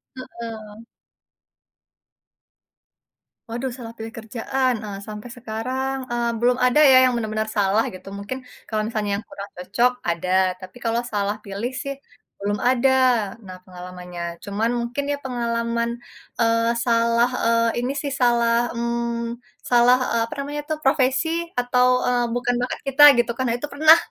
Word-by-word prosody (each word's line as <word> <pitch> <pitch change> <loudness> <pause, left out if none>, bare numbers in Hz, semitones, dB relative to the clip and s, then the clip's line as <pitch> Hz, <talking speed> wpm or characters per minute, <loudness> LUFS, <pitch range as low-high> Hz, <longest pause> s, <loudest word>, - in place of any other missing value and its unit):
Heeh. 225 -4 -9 2.7
Waduh, 245 +3 -3
salah 230 -2 -8
pilih 225 +1 -7
kerjaan, 250 +4 -1
eee, 200 -2 -6
sampai 210 +2 -8
sekarang, 255 +4 -3 0.2
eee, 240 0 0
belum 245 +2 +3
ada 250 +4 +4
ya, 260 - +8
yang - - -2
benar-benar 215 -1 -2
salah 200 +2 +3
gitu. 185 - -12
Mungkin 205 +6 -5 0.3
kalau 215 -1 0
misalnya 215 -2 -2
yang 210 - -8
kurang 200 0 -8
cocok 200 +8 +2 0.2
ada, 170 +1 -2 0.3
tapi 185 +4 -11
kalau 230 +1 +1
salah 205 -1 0
pilih 200 +5 -4
sih 275 -1 -4 0.5
belum 205 +1 -1
ada, 260 +1 +3 0.6
nah 185 -1 -9
pengalamannya. 180 -1 -9 0.2
Cuman 210 +3 -1
mungkin 240 +4 -3
ya 285 - -1
pengalaman, 235 -1 -1 0.5
eee, 230 0 +3 0.2
salah, 235 0 +3 0.2
eee, 230 +1 +2
ini 255 +3 -1
sih 285 - -3
salah, 235 -1 +3 0.2
mmm, 235 0 -2 0.3
salah, 245 +1 +6
eee, 235 - +2
apa 230 - -8
namanya 290 +1 -4
itu 310 - -2
profesi 270 +2 +2 0.3
atau, 250 0 +3 0.2
eee, 245 -1 +2
bukan 245 0 0
bakat 250 - -3
kita 275 +2 +5
gitu 240 0 +2
kan. 260 - 0
Nah, 230 - +1
itu 295 - -5
pernah. 310 +3 +7
235 Hz, 145 wpm, -22 LUFS, 215-250 Hz, 2.7 s, ya